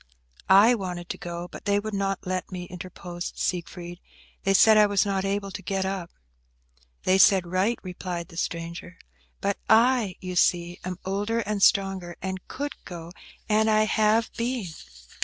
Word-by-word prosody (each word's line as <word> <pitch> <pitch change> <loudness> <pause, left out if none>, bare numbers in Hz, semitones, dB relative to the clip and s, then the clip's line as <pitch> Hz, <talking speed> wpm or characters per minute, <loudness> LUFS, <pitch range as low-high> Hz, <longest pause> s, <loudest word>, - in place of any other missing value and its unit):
"I 200 +5 +7
wanted 180 -5 -4
to - - -4
go, 175 0 -5
but - - -11
they 200 0 +2
would 215 +1 -5
not 195 -1 -2
let 185 0 -3
me," 180 -1 -5
interposed 180 0 -7
Siegfried. 175 0 -4 0.4
"They 195 0 +2
said 220 +2 +7
I 210 -1 +6
was 200 0 +2
not 195 -1 -1
able 200 0 -2
to 195 - -7
get 190 0 -2
up." 190 -3 -3 0.9
"They 190 +1 +3
said 190 -1 +6
right," 185 +7 +1
replied 180 -1 -5
the 165 - -12
stranger. 170 +1 -4 0.4
"But 200 0 -1
I, 225 -3 +4
you 185 -1 -6
see, 175 0 +2
am 185 -1 -4
older 205 +4 -1
and 210 -1 -3
stronger, 195 -3 +2
and 190 0 -4
could 290 +2 -6
go; 170 -2 -8 0.4
and 220 0 +3
I 215 0 +4
have 215 +1 +2
been." 240 -2 -2
190 Hz, 165 wpm, -26 LUFS, 180-210 Hz, 0.9 s, I